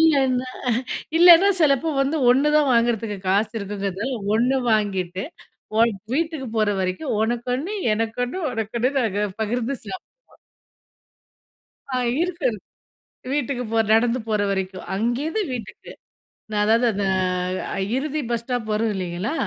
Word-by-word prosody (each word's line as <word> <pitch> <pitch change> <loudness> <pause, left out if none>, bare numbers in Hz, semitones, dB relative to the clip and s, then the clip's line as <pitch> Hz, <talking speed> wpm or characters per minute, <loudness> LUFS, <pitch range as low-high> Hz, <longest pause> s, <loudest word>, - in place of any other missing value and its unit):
இல்லன்னா, 265 -5 +3 0.7
இல்லன்னா 350 +3 +8
சிலப்போ 300 +1 +3
வந்து 280 +4 0
1 270 +4 +4
தான் 285 -4 +3
வாங்குறதுக்கு 230 -3 +1
காசு 205 +3 +2
இருக்குங்கிறதுநால 200 +4 -3 0.2
1 250 +4 +2
வாங்கிட்டு 190 -3 0 0.9
வீட்டுக்கு 315 -3 -1
போற 215 -1 +3
வரைக்கும் 185 +8 -2
உனக்கு 235 +2 -1
1 340 +11 -4 0.2
எனக்கொன்னு 225 - -2
உனக்கொன்னு 230 +2 -1
நாங்க 210 -4 0 0.2
பகிர்ந்து 240 +4 -1
சாப்பிடுவோம். - - -11 1.6
ஆ - - +1 0.2
இருக்கு. 340 -5 -1 0.9
வீட்டுக்கு 260 -3 -1
போ 225 - +2
நடந்து 235 +2 +3
போற 210 -2 +1
வரைக்கும். 190 -1 -3
அங்கிருந்து 260 - -1
வீட்டுக்கு 215 -4 -8 0.6
நான் 210 0 +1
அதாவது 230 +3 +3
அந்த 200 0 -1 0.9
இறுதி 300 +2 -2
பஸ் 235 -1 -1
ஸ்டாப் 245 -2 -3
வரும் 220 0 +1
இல்லீங்களா? 185 - -3
235 Hz, 115 wpm, -23 LUFS, 210-275 Hz, 1.6 s, இல்லன்னா